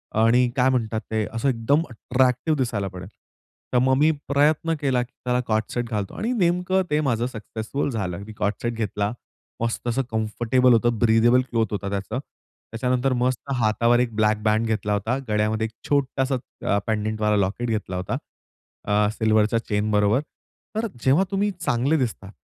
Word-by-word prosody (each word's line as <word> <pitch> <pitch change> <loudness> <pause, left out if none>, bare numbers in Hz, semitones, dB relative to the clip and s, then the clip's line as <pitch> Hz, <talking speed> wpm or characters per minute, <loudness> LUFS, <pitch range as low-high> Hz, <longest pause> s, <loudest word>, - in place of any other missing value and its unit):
आणि 115 +3 +4
काय 130 0 +3
म्हणतात 115 -4 0
ते, 110 -1 0
असं 115 +5 0
एकदम 130 +5 +2
अट्रॅक्टिव्ह 125 +5 +1
दिसायला 115 -6 -1
पडेल. 95 0 -8 0.7
तर - - +4
मग 130 +1 +3
मी 150 +3 +4 0.2
प्रयत्न 150 +3 +2
केला 130 -3 +2
की 120 - -15
त्याला 125 0 +1
को-ऑर्ड 110 0 +2
सेट 120 -1 -2
घालतो 105 -4 -3
आणि 230 +3 -1
नेमकं 180 -2 +2
ते 150 +1 +2
माझं 120 -5 0
सक्सेसफुल 110 +3 -4
झालं. 95 -7 -3
मी 110 - -9
को-ऑर्ड 105 0 -1
सेट 120 0 -1
घेतला. 105 -2 -2 0.5
मस्त 115 +1 -2
असं 120 +3 +1
कम्फर्टेबल 120 +3 +2
होतं, 120 0 +2
ब्रीदेबल 120 +2 +4
क्लॉथ 115 -2 +1
होतं 100 -1 -3
त्याचं. 100 +5 -3
त्याच्यानंतर 125 -1 -3
मस्त 125 +2 -1
हातावर 115 +1 +3
1 120 -3 -1
ब्लॅक 110 0 +3
बँड 110 +1 +2
घेतला 105 -2 -1
होता, 110 +5 0
गळ्यामध्ये 105 +1 +1
एक 110 - -16 0.2
छोटासा 135 -1 +1 0.4
अ, - - +3
पेंडंटवाला 110 -1 0
लॉकेट 100 +5 -1
घेतला 105 -4 -2
होता. 90 +1 -2 0.7
अ, 105 0 +3
सिल्व्हरच्या 110 0 +2
चेनबरोबर. 105 +2 +2 0.5
तर 225 +1 0 0.2
जेव्हा 140 +8 +4
तुम्ही 200 +1 +1
चांगले 140 0 +1
दिसता 115 -7 -3
115 Hz, 165 wpm, -24 LUFS, 110-130 Hz, 0.7 s, आणि